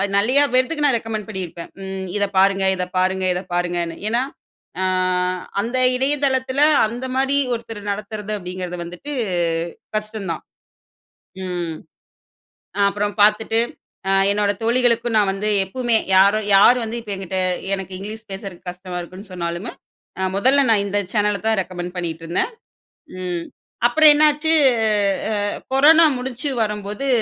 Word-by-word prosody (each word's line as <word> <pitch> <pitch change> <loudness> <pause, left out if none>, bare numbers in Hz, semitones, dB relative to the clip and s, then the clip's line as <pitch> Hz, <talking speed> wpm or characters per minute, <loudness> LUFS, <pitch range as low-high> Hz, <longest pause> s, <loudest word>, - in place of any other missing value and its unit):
நிறைய 250 +8 +3
பேத்துக்கு 295 +5 +1
நான் 275 -4 +3
ரெக்கமண்ட் 220 -2 -5
பண்ணிருப்பேன். 180 -5 -6
"ம், 190 0 -5
இதப் 200 -1 -1
பாருங்க, 195 0 +4
இதப் 180 0 -5
பாருங்க, 190 +1 +1
இத 180 - -3
பாருங்கன்னு". 175 -1 -1
ஏன்னா, 235 +3 +1 0.6
ஆ - - +1 0.8
அந்த 235 +5 -2 0.2
இணையதளத்துல 265 0 0 0.2
அந்த 240 +4 -5
மாரி 270 +1 +1 0.2
ஒருத்தர் 230 -2 -6
நடத்துறது 210 +1 -5
அப்டீங்குறது 180 -1 -6
வந்துட்டு 180 +12 -8 0.8
கஷ்டம் 215 -2 -4
தான். 160 - -5 1.0
ம். 175 -3 -4 1.1
அப்பறம் 205 0 -2
பாத்துட்டு, 215 +2 +3 0.5
அ - - +3 0.2
என்னோட 205 0 +1
தோழிகளுக்கும் 235 0 +2
நான் 205 -2 +3
வந்து 210 +2 -2 0.2
எப்பவுமே 240 +4 0 0.2
யாரும் 200 +3 +4
யார் 220 +6 +7
வந்து 225 +1 -4
இப்போ 215 -3 -7
என்கிட்ட, 190 0 -3 0.4
"எனக்கு 190 -1 -7
இங்கிலீஷ் 215 +2 -8
பேசுறக்கு 195 -2 -8
கஷ்டமா 180 0 -8
இருக்குன்னு" 185 +3 -11
சொன்னாலுமே, 175 +4 -4 0.5
அ 190 - +1
மொதல்ல 265 +7 +3
நான் 205 -2 +3
இந்த 205 +1 0
சேனல 210 -2 +1
தான் 220 -2 +2
ரெக்கமெண்ட் 180 0 -7
பண்ணிட்டுருந்தேன். 170 - -2 0.7
ம். 175 -2 -3 0.4
அப்பறம் 305 +4 +7
என்னாச்சு, 300 +1 +3 0.8
ஆ - - -1 0.4
கொரோனா 315 +4 +7
முடிச்சு 255 +2 -3
வரும்போது, 210 +4 -3
205 Hz, 130 wpm, -20 LUFS, 185-240 Hz, 1.1 s, யார்